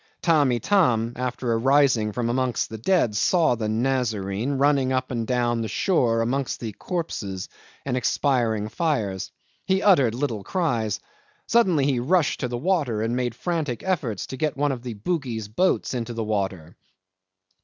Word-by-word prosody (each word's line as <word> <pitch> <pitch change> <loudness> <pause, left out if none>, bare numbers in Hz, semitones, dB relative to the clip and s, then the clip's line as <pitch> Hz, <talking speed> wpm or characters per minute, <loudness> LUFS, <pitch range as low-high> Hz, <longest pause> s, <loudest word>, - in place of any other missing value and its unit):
Tamb' 150 -6 +4
Itam, 120 - +2
after 125 -1 -2
arising 125 -2 +3
from 120 +2 -2
amongst 125 -1 -1
the 110 - -6
dead, 125 - +2
saw 165 - +3
the 110 -2 -2
Nazarene 115 -1 -1
running 135 -1 +2
up 130 0 -1
and 115 -3 -2
down 120 -2 +1
the 110 - -2
shore 120 - +1
amongst 130 +3 -1
the 115 -2 -4
corpses 100 - -4 0.4
and 130 -2 -1
the - - +1
expiring 115 -5 +1
fires. 110 - -1 0.4
He 190 +1 +2
uttered 140 - +4
little 120 -6 -2
cries. 120 - -1 0.5
Suddenly 185 -12 +3
he 135 -3 +1
rushed 155 +4 +1
to 125 - -1
the 120 0 -3
water, 140 - 0
and 115 +2 -1
made 125 -2 -1
frantic 155 -6 -2
efforts 145 - -1
to 130 - -7
get 150 -1 -1
one 145 0 +1
of 130 -3 -4
the 120 -2 -6
Bugis 120 - -3
boats 180 - +1
into 120 -1 -4
the 115 - -2
water. 95 -6 -3
125 Hz, 165 wpm, -24 LUFS, 115-145 Hz, 0.5 s, Tamb